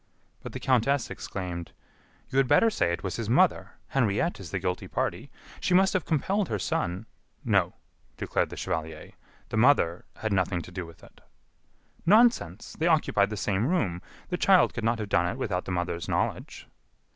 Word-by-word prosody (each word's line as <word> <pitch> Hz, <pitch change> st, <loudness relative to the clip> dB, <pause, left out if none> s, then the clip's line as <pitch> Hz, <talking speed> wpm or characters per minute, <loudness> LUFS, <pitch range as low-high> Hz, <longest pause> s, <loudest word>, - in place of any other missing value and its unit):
But -, -, -8 dB
the -, -, -5 dB
countess 130 Hz, +1 st, +1 dB
exclaimed: 90 Hz, -3 st, -6 dB, 0.6 s
"You 130 Hz, -, -1 dB
had 135 Hz, -, +3 dB
better 185 Hz, -, +4 dB
say 85 Hz, -, +1 dB
it 85 Hz, +1 st, -3 dB
was 95 Hz, -, -3 dB
his 115 Hz, -2 st, -4 dB
mother. 120 Hz, -, +2 dB, 0.2 s
Henriette 125 Hz, -, 0 dB
is 95 Hz, -4 st, -8 dB
the 95 Hz, -, -2 dB
guilty 90 Hz, 0 st, -3 dB
party. -, -, -3 dB, 0.3 s
She 180 Hz, -, +1 dB
must 190 Hz, +1 st, +4 dB
have 185 Hz, -4 st, 0 dB
compelled 190 Hz, +6 st, 0 dB
her 105 Hz, -, -1 dB
son 90 Hz, +1 st, -2 dB, 0.2 s
" -, -, -35 dB
"No," -, -, +2 dB, 0.4 s
declared -, -, -1 dB
the -, -, -9 dB
chevalier, 80 Hz, -1 st, -4 dB, 0.4 s
"the -, -, -2 dB
mother 110 Hz, -9 st, +3 dB
had 110 Hz, -2 st, -2 dB
nothing 90 Hz, -2 st, 0 dB
to -, -, -12 dB
do 90 Hz, -1 st, -5 dB
with 85 Hz, -, -16 dB
it." -, -, -18 dB, 0.8 s
"Nonsense! 200 Hz, -, +3 dB
they 165 Hz, -, +2 dB
occupied 150 Hz, -11 st, +3 dB
the 105 Hz, -, -5 dB
same 100 Hz, +3 st, 0 dB
room. 100 Hz, -, 0 dB, 0.3 s
The 180 Hz, -, -1 dB
child 190 Hz, -1 st, +4 dB
could 115 Hz, -, -5 dB
not 115 Hz, +1 st, +1 dB
have 105 Hz, -2 st, -4 dB
done 85 Hz, -2 st, +2 dB
it 115 Hz, -, -3 dB
without 100 Hz, -8 st, -2 dB
the -, -, -4 dB
mother's 90 Hz, -2 st, -2 dB
knowledge." -, -, -2 dB
105 Hz, 185 wpm, -27 LUFS, 90-145 Hz, 0.8 s, better